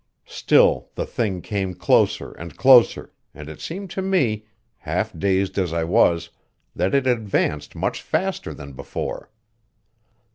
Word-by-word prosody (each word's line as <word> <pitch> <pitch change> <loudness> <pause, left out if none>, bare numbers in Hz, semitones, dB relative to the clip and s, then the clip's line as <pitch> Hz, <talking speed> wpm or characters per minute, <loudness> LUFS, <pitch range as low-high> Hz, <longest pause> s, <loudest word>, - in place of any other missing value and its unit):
Still - - +2
the - - -2
thing 95 -6 -2
came 95 -3 -3
closer 85 -1 +2
and 85 0 -10
closer, 130 -2 +5 0.2
and 75 - -9
it 75 -1 -10
seemed 190 +2 -6
to 190 - -3
me, 125 - 0 0.3
half 90 +5 -3
dazed 95 +2 0
as 90 -3 -1
I 85 -1 0
was, 85 0 +2 0.4
that 95 - 0
it 135 -1 +2
advanced 105 - -1
much - - -2
faster - - -2
than 70 -1 -10
before. - - -6
95 Hz, 140 wpm, -22 LUFS, 85-120 Hz, 0.4 s, closer